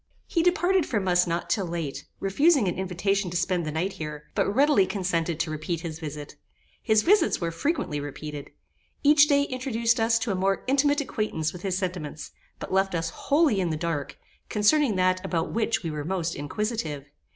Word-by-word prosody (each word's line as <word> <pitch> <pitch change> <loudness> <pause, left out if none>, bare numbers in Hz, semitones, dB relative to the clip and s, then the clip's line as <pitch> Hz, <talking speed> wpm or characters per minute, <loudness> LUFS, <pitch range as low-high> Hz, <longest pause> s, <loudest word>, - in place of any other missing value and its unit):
He 335 - 0
parted 365 -2 +1
from 205 -5 -1
us 180 0 +3
not 170 0 -2
till 195 -5 0
late, 165 -5 -4
refusing 275 - +3
an 175 - +1
invitation 190 +1 -1
to 175 - -2
spend 180 -1 0
the - - -2
night 175 +6 -2
here, 150 -1 -7
but - - +1
readily 270 -4 +4
consented 175 -4 -1
to 165 -1 -1
repeat 155 +2 -3
his 160 -2 -6
visit. 150 -2 -7 0.4
His 215 -1 +3
visits 380 -2 +3
were 170 -1 -2
frequently 165 - -1
repeated. 145 0 -7 0.5
Each 295 0 +6
day 285 -1 +3
introduced 240 -4 0
us 225 +1 +3
to 230 -1 -2
a - - 0
more 195 +1 0
intimate 285 +2 +2
acquaintance 210 - -2
with 180 - -9
his 185 -1 -1
sentiments, 175 -6 -4 0.3
but - - -7
left 195 -1 +2
us 165 0 -2
wholly 285 - +2
in 180 -2 0
the 155 - -2
dark, 150 -4 -3 0.3
concerning 225 +3 +3
that 185 0 +1
about 165 -1 -2
which 230 -1 0
we 165 - -3
were 150 -1 -4
most 170 0 -2
inquisitive. 150 - -3
185 Hz, 185 wpm, -26 LUFS, 165-230 Hz, 0.5 s, Each